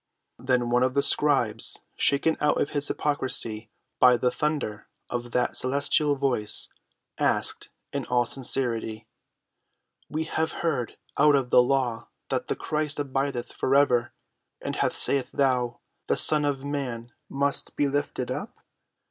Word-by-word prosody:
Then 125 -1 0
one 125 +1 +3
of 130 +1 +1
the 140 - +3
scribes, 125 -7 +2
shaken 145 +3 +2
out 150 - +2
of - - -1
his 145 -1 -1
hypocrisy 120 -6 0 0.3
by 125 -1 +6
the 125 +1 +1
thunder 145 -9 -3 0.2
of 120 0 -3
that 125 +1 -1
celestial 140 +2 +1
Voice, 130 -6 -1 0.5
asked - - 0 0.2
in - - -3
all 125 -1 +2
sincerity: 120 -4 -1 1.0
"We 155 +1 -2
have 160 0 -2
heard 140 -8 -1 0.2
out 150 0 +6
of 130 -3 -1
the - - +7
law 125 -3 -1 0.2
that - - -2
the - - -1
Christ 150 -1 -2
abideth 135 -3 -2
for 135 - 0
ever: 125 -4 +3 0.5
and - - -4
how - - +2
sayest 135 -3 +2
thou, 125 -3 +1 0.3
The - - +1
Son 150 -1 +6
of 140 -1 -2
man 125 -5 -4 0.2
must 140 +1 -1
be 145 - +1
lifted 140 -3 -2
up? - - -6
135 Hz, 145 wpm, -26 LUFS, 120-145 Hz, 1.0 s, the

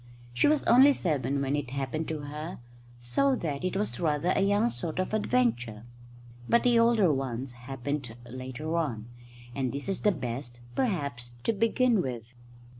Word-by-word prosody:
She 120 - +3
was 300 -1 +3
only 270 +4 +7
seven 140 - 0
when 135 +1 0
it 145 -4 -3
happened 140 +4 -3
to 155 -2 -3
her, 150 +4 -6 0.4
so 260 - +2
that 150 - -3
it 185 +1 -1
was 210 +1 -2
rather 165 +1 +1
a - - +2
young 205 +4 +3
sort 165 -4 -5
of 185 +3 -1
adventure; 205 - 0 0.7
but 235 - +4
the 240 -2 +4
older 230 -8 +4
ones 130 -1 -3
happened 125 0 -5
later 130 +6 -5
on, 120 -10 -2 0.5
and 130 -2 -1
this 140 +4 -5
is 195 - -2
the 210 - +4
best, 120 -5 -5
perhaps, 140 - -1
to 230 - +1
begin 230 +1 +2
with. 120 -4 -5
150 Hz, 165 wpm, -29 LUFS, 130-205 Hz, 0.7 s, only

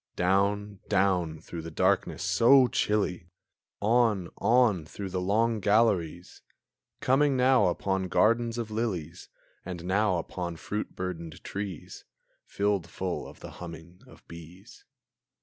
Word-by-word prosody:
Down, 100 +2 0
down, 90 -6 +1
through 85 0 -7
the 80 - -7
darkness 80 - 0
so 130 +3 +5
chilly! 100 -7 -1 0.5
On, 110 -4 +2
on, 115 -5 +3
through 95 +5 -7
the 90 - -2
long 110 +4 +1
galleries! 95 -5 +1 0.6
Coming 135 +1 +3
now 130 -2 +4
upon 95 +1 -1
gardens 115 +4 +2
of 115 -2 -4
lilies, 100 -8 -4 0.3
And 90 -1 -7
now 95 0 +2
upon 85 0 -5
fruit 105 +6 -5
burdened 85 -3 -6
trees, 100 -4 -6 0.4
Filled 100 -4 -1
full 95 -1 -4
of - - -14
the - - -9
humming 85 +1 -10
of - - -18
bees. 85 +3 -13
95 Hz, 125 wpm, -28 LUFS, 85-110 Hz, 0.6 s, so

